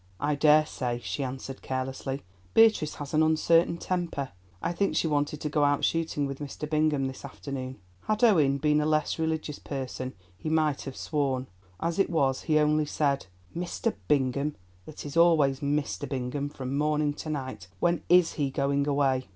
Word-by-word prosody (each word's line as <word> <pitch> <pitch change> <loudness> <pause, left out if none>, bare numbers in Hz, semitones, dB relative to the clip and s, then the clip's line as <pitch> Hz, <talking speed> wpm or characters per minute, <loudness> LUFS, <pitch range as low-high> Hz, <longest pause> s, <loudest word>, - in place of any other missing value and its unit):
"I 150 +1 +1
daresay," 145 -5 +3
she 140 - -3
answered 135 0 -6
carelessly; 135 +1 -3 0.3
"Beatrice 220 -9 +5
has 145 0 -7
an 155 - +4
uncertain 165 +2 +3
temper. 170 -7 -2 0.3
I - - -1
think 200 +3 0
she - - +2
wanted 145 -1 0
to - - -1
go 150 0 +2
out 145 0 +3
shooting 160 -3 0
with 140 -1 -5
Mr. 145 +1 -5
Bingham 150 -2 +1
this 130 0 -6
afternoon." 135 -2 -6 0.3
Had 215 +2 0
Owen 155 -12 +5
been 150 +1 +2
a 150 - 0
less 155 +1 +1
religious 160 -2 -2
person 130 -2 -5 0.2
he 155 - -5
might 155 -3 +1
have 135 - -7
sworn; 135 -4 -1 0.3
as 170 +2 -1
it 195 - +3
was, 140 -6 +1
he 155 -1 +2
only 150 0 +3
said, 140 -7 0 0.3
"Mr. 180 +6 -2
Bingham—it 135 -5 -2
is 145 - -6
always 155 -6 +4
Mr. 145 0 -1
Bingham 135 +2 -2
from 135 -2 -5
morning 150 0 +1
to 155 - -7
night! 130 -10 -4
When 170 - +2
is 180 -1 +5
he 145 -3 -1
going 140 +1 0
away?" 135 -3 +1
145 Hz, 170 wpm, -28 LUFS, 135-155 Hz, 0.3 s, Beatrice